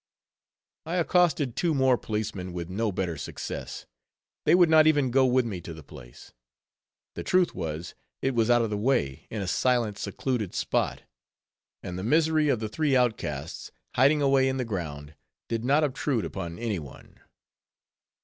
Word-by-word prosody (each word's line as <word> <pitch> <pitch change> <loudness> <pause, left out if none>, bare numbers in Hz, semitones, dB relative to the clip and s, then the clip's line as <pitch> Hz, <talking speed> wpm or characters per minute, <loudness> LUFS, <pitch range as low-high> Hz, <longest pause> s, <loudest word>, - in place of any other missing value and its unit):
I 165 +3 -4
accosted 170 -7 +2
two 165 -3 +1
more 130 -2 +4
policemen, 105 -5 -4
but 90 - -8
with 85 -1 -5
no 105 +3 -1
better 90 -3 -2
success; - - -6 0.6
they 160 - +6
would 175 -1 +6
not 155 -1 +6
even 145 -5 +3
go 130 +1 +4
with 125 0 +3
me 100 -6 -4
to 85 -1 -8
the 80 - -11
place. 70 -5 -14 0.8
The - - -5
truth 185 -1 +2
was, 80 +1 -5 0.3
it 135 - 0
was 115 -1 +1
out 120 -1 +5
of 110 - -2
the 105 - -1
way, 105 - 0
in 105 -3 -4
a - - -5
silent, 115 0 +1
secluded 105 0 -3
spot; - - -1 0.8
and 90 0 -5
the - - -5
misery 155 +4 +3
of 125 - +2
the 110 - -3
three 145 +5 0
outcasts, 95 - -1 0.2
hiding 145 +4 +4
away 135 -1 +4
in 130 - -2
the 130 - -1
ground, 80 -8 -5 0.3
did 115 -1 -2
not 145 +5 +3
obtrude 130 - -1
upon 85 -1 -5
any 110 -5 -2
one. 70 -4 -13
115 Hz, 170 wpm, -27 LUFS, 90-135 Hz, 0.8 s, they